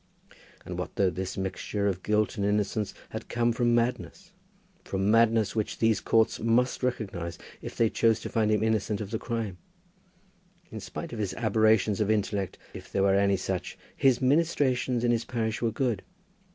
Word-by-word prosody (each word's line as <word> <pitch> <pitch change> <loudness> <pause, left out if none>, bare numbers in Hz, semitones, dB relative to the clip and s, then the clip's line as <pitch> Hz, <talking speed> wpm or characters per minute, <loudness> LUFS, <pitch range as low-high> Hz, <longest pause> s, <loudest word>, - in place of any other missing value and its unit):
And - - -5
what - - -5
though 95 -2 +2
this 95 +3 -5
mixture 95 +2 -2
of 95 -2 0
guilt 105 +1 +1
and 100 - -2
innocence 105 0 0
had - - -7
come 120 0 +1
from 120 0 +2
madness, 125 +10 -2 0.5
from 95 +1 0
madness 115 -2 +3
which 110 -2 -2
these 115 -1 +2
courts 115 0 +2
must 115 +3 +1
recognize 95 -9 -3 0.2
if - - -8
they 115 - +4
chose 115 0 +2
to - - -5
find 110 -2 +1
him 105 0 +2
innocent 110 -2 0
of 105 -2 -6
the 110 - -2
crime? 115 -6 -4 1.1
In - - -6
spite - - -7
of 115 - -5
his 100 -3 -2
aberrations 110 -1 +2
of 105 - +1
intellect, 100 -3 -1 0.2
if - - -10
there 95 - +1
were 100 -1 +4
any 100 0 +3
such, 95 -1 -4 0.2
his 130 -1 +3
ministrations 130 -4 +2
in 120 - +3
his 115 -1 +1
parish 115 -3 -2
were 115 - +2
good. 120 -4 -1
110 Hz, 180 wpm, -28 LUFS, 100-115 Hz, 1.1 s, they